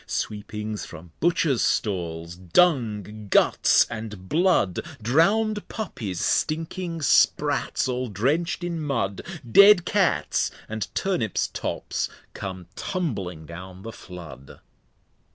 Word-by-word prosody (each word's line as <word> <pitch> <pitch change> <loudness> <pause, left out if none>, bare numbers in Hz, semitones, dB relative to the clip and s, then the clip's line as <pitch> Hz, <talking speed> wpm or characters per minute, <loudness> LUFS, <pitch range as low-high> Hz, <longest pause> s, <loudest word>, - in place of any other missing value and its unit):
Sweepings 105 -1 -4
from 85 0 -11
Butchers 160 -5 +2
Stalls, 85 -4 -1
Dung, 105 - +1
Guts, - - +4
and 105 -4 -7
Blood, 160 - +2
} - - -16
Drown'd 205 - +2
Puppies, 110 - -5
stinking 165 +1 -1
Sprats, - - +2
all 125 0 -2
drench'd 145 - 0
in 170 -2 -3
Mud, 100 -10 -1 0.2
} 120 -6 -14
Dead 200 -3 +8
Cats 195 0 +1 0.2
and 110 -2 -3
Turnips 125 - 0
Tops - - -3 0.2
come 95 -2 -6
tumbling 100 - -3
down 90 +3 -10
the 115 - -6
Flood. 80 - -11
110 Hz, 110 wpm, -25 LUFS, -, 0.2 s, Dead